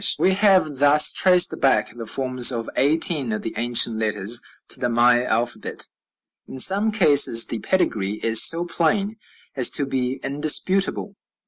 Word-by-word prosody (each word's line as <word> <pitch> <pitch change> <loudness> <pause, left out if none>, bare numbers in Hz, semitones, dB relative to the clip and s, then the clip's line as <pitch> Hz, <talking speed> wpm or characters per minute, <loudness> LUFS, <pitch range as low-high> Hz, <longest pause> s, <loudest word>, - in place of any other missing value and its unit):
We 190 - 0
have 190 -7 0
thus 145 +2 +3
traced 180 -1 +3
back 135 -4 -1
the 115 -2 -10
forms 130 0 0
of 115 -2 -6
eighteen 145 -2 0
of 105 - -6
the 115 - -7
ancient 115 0 +1
letters 110 +2 -1 0.3
to - - +1
the 125 - -3
Maya 120 +1 +1
alphabet. 120 -1 -4 0.6
In - - -11
some 200 +10 +3
cases 145 - +3
the 115 - -6
pedigree, 105 - -3
is 115 -1 +4
so 170 +1 +3
plain 195 +6 -3 0.4
as 130 -3 +4
to 145 - +1
be 130 -1 -4
indisputable. 185 +8 0
135 Hz, 150 wpm, -20 LUFS, 120-175 Hz, 0.6 s, is